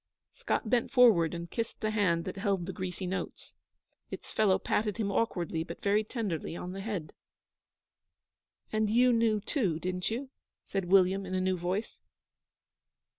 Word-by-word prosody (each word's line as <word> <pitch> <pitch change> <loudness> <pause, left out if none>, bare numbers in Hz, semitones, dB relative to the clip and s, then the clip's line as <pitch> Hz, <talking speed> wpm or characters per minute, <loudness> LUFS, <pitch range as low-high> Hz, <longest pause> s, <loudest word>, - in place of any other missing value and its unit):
Scott - - -2
bent 235 +1 +2
forward 225 - +5
and 170 0 -6
kissed 230 -1 -3
the 215 - -1
hand 180 -6 +1
that - - -4
held 195 -3 0
the 190 - -5
greasy 185 -1 -4
notes. 190 +2 -5 0.6
Its - - -8
fellow 205 -3 +3
patted 210 0 -1
him 205 -3 -1
awkwardly 175 -7 -1
but - - -9
very 205 +2 +3
tenderly 205 - -3
on 180 +1 -5
the 195 +1 -6
head. 195 -7 -4 1.6
'And 215 -1 +1
you 245 +3 +5
knew, 225 -2 +3
too, 200 - 0
didn't 180 +1 -2
you?' 260 +4 -4 0.3
said 195 -2 -2
William, 190 +1 +4
in 185 0 -4
a - - +1
new 185 0 +1
voice. 180 +5 -3
195 Hz, 160 wpm, -30 LUFS, 180-220 Hz, 1.6 s, forward